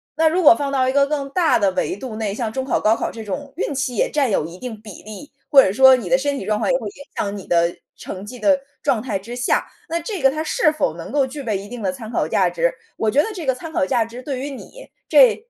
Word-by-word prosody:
那 320 0 +4
如 360 +3 +1
果 340 - +8
放 280 -1 -3
到 260 -2 +2
一 260 - +1
个 280 0 +4
更 280 -1 -3
大 345 -1 +3
的 195 -2 +2
维 185 +1 -2
度 235 -1 -7
内， 215 -3 -2
像 220 -1 -3
中 265 - -2
考、 265 - 0
高 220 +1 +3
考 - - -3
这 225 -2 -8
种 275 +8 -5
运 295 -6 -2
气 260 -4 -2
也 - - +2
占 275 -7 +1
有 155 - +1
一 170 +2 -9
定 230 -3 -7
比 210 -5 -11
例， 215 +8 -10 0.2
或 275 -2 +8
者 190 - +1
说 265 +1 +7
你 210 -7 -6
的 260 - +5
身 280 0 -1
体 190 - -6
状 210 0 0
况 - - +1
也 260 - +3
会 230 - -8
影 - - -8 0.2
响 200 0 -2
你 190 - -9
的 170 0 +2 0.2
成 190 0 -7
绩 250 +4 -9
的 285 +1 +3 0.2
状 220 - +1
态 220 -6 -2
之 230 +6 -8
下， 250 - +1 0.2
那 335 +1 -1
这 365 0 -5
个 270 - +6
它 310 +3 -3
是 305 -1 +2
否 300 - -1
能 165 - -8
够 280 -2 +2
具 280 +2 -7
备 215 -6 -1
一 200 +1 -8
定 245 -2 -7
的 190 -2 0
参 220 +4 -8
考 - - 0
价 - - +2
值， - - +1 0.3
我 220 - +1
觉 280 +6 +4
得 - - -3
这 345 -6 -6
个 260 - +2
参 320 +4 -8
考 285 - 0
价 245 -4 +1
值 240 +2 -9
对 270 -2 -4
于 280 +2 -4
你， - - -11 0.2
这 - - +7
255 Hz, 315 characters per minute, -21 LUFS, 215-285 Hz, 0.3 s, 果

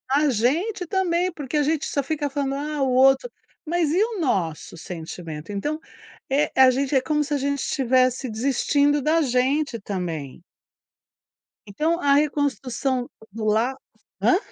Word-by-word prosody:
A 295 +1 +3
gente 330 - 0
também, 365 -1 +1
porque 300 -3 -4
a - - +3
gente 305 +1 0
só 280 - 0
fica 290 +1 -2
falando: 275 -1 -2
"Ah, 295 +1 -3
o 265 - +1
outro". 270 - +4 0.4
Mas 330 -1 0
e 360 +5 +2
o 445 -2 -1
nosso 170 - -1
sentimento? 165 0 -7
Então, 290 +10 -2 0.5
eh, 285 +3 +2
a 260 -1 +7
gente 275 +2 -1
é 265 - +4
como 300 +3 0
se 295 +1 -4
a - - +2
gente 280 +1 -1
estivesse 255 -1 +1
desistindo 280 +5 +1
da 315 +4 +2
gente, 265 0 +1
também. 170 -9 -5 1.3
Então 315 - 0
a 285 -4 +3
reconstrução 275 -3 0 0.2
do 220 +1 -5
la 225 +5 +2 0.5
Hã? 365 - +4
275 Hz, 155 wpm, -23 LUFS, 245-300 Hz, 1.3 s, a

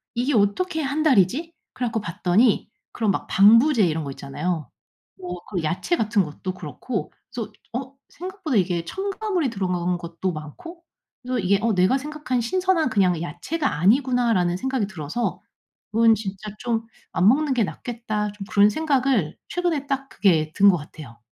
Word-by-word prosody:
이게 250 +5 0
어떻게 290 - +1
1 290 +2 -1
달이지?' 280 - +3 0.2
그래 250 - -2
갖고 225 -1 -2
봤더니 200 +4 +2 0.2
그런 220 -4 +1
막 - - -3
방부제 230 +4 +6
이런 160 -1 -1
거 140 - -5
있잖아요. 150 +2 -4 0.5
뭐 180 -1 -6
그 180 -5 -2
야채 180 - 0
같은 215 -2 +2
것도 175 +4 -5
그렇고 185 - -5 0.2
그래서 225 -3 -5 0.2
어 260 +2 -5
생각보다 370 -5 -5
이게 175 -3 0
첨가물이 390 - -2
들어간 180 -3 -1
것도 170 +2 -4
많고 165 - -9 0.4
그래서 250 0 -2
이게 195 0 +2
'어. 230 0 +2
내가 185 +8 +3
생각한 290 -3 -3
신선한 360 +3 +1
그냥 185 -7 +2
야채가 280 - -2
아니구나.'라는 230 -4 +3
생각이 260 -1 -1
들어서 180 +4 -3 0.5
'그건 225 +1 +5
진짜 205 0 -6
좀 230 -2 -2 0.2
안 180 - +3
먹는 285 +3 +2
게 240 -3 +2
낫겠다.' 215 -2 -4
좀 205 -1 -8
그런 205 +1 +6
생각을 260 - +1
최근에 335 -6 -1
딱 275 -1 -2
그게 160 -6 +2
든 200 0 +7
것 185 - +3
같아요. 150 -5 -11
220 Hz, 340 characters per minute, -23 LUFS, 180-270 Hz, 0.5 s, 든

